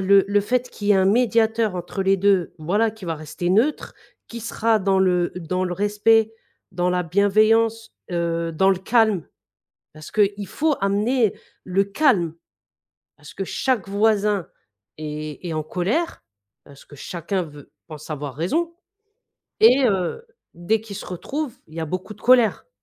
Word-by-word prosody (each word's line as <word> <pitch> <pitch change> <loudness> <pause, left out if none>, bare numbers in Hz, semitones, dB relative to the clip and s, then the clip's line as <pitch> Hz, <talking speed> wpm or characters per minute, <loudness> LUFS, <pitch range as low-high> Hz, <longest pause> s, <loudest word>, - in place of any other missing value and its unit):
le 195 +1 +5
le 205 +1 +2
fait 250 +4 -1
qu'il 205 -1 -5
y - - +4
ait - - +4
un 190 -1 +3
médiateur 225 -1 +2
entre 180 +2 -4
les 195 +1 +3
2 195 -2 +2
voilà, 205 +8 +1
qui 215 -2 -13
va 165 -2 -2
rester 155 +3 -4
neutre, 235 +11 +1 0.3
qui 235 - -7
sera 225 0 +1
dans 195 -1 +1
le 180 -2 +2
dans 180 +1 -2
le 180 -1 -3
respect, 210 +3 +2 0.4
dans 180 0 0
la 180 0 +1
bienveillance, 215 +5 +2 0.2
heu, 170 -1 -1
dans 190 +4 +3
le 190 - +1
calme, 215 -3 +2 0.7
parce 155 0 -11
qu'il 205 -1 +1
faut 305 - 0
amener 210 +3 +1 0.3
le 190 +1 +1
calme. 200 - +1 0.8
Parce 150 +2 -13
que 195 - -3
chaque 255 +2 -1
voisin 205 -2 +1 0.5
est 155 +2 -6
est 165 - -3
en 155 - -2
colère, 200 - -2 0.4
parce 140 -1 -16
que 145 - -14
chacun 180 +6 -3
veut 145 -4 -12 0.2
pense 155 -2 -10
avoir 145 -3 -5
raison 325 - -1 0.9
et 255 +4 +6
heu, 195 - -2 0.3
dès 210 +6 0
qu'ils 210 -3 -8
se - - -8
retrouvent 255 - -5
il 155 - -17
y 165 - -4
a 160 - -2
beaucoup 185 +6 -5
de - - -23
colère. 245 - +3
195 Hz, 165 wpm, -22 LUFS, 175-225 Hz, 0.9 s, et